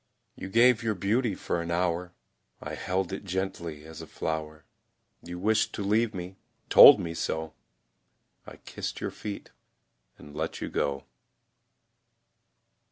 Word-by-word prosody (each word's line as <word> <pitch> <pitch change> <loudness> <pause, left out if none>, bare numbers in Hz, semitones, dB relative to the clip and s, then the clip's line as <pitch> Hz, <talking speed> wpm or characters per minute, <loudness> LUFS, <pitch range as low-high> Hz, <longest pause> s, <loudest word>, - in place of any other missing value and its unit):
You 95 - -7
gave 120 +2 +4
your 110 -2 -1
beauty 105 +3 0
for 85 - -3
an 85 - -6
hour, 90 +1 -1 0.4
I - - -7
held 95 0 -2
it 95 - -5
gently 90 -5 -4
as 80 0 -10
a - - -10
flower. 80 -1 -5 0.6
You 90 +1 -8
wished 105 +4 +1
to 105 - -4
leave 110 +2 +1
me, 90 +1 -7 0.3
told - - +10
me 85 - -4
so, 80 -1 -3 0.9
I - - -10
kissed - - -7
your - - -3
feet 105 -2 -7 0.7
and 75 0 -13
let 80 +1 -4
you - - -4
go. 70 0 -2
90 Hz, 140 wpm, -28 LUFS, 80-100 Hz, 0.9 s, told